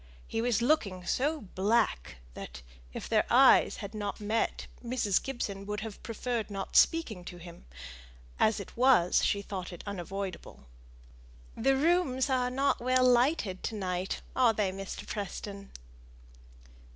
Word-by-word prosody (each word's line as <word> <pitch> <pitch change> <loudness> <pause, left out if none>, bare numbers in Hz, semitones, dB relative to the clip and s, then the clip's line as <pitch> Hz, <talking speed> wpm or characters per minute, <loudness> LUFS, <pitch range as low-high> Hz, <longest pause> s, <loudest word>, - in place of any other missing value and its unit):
He 225 - -2
was 235 -1 +1
looking 200 - +1
so 295 - 0
black 205 - +1 0.2
that, 60 +1 -9 0.3
if - - -6
their - - +3
eyes - - +6
had 200 - -9
not 205 -1 -4
met, 215 +2 -1 0.2
Mrs. 235 -5 +1
Gibson 205 -7 -4
would 210 0 -3
have 215 -2 -7
preferred 230 -1 -3
not 195 -1 -6
speaking 235 - +3
to 175 - -8
him; 170 - -12 0.7
as 215 -1 +3
it 200 - -9
was, 240 -8 +4
she 200 0 +1
thought 190 -3 -6
it 175 - -9
unavoidable. 195 - -6 0.9
"The 270 +4 +2
rooms 285 -4 +2
are 250 -1 +1
not 270 +2 +1
well 255 +1 +2
lighted 245 - +2
to 225 - -3
night, 185 -1 -3
are 245 -3 +4
they, 205 -3 0
Mr. 195 0 -7
Preston?" 200 0 -6
215 Hz, 140 wpm, -30 LUFS, 195-250 Hz, 0.9 s, eyes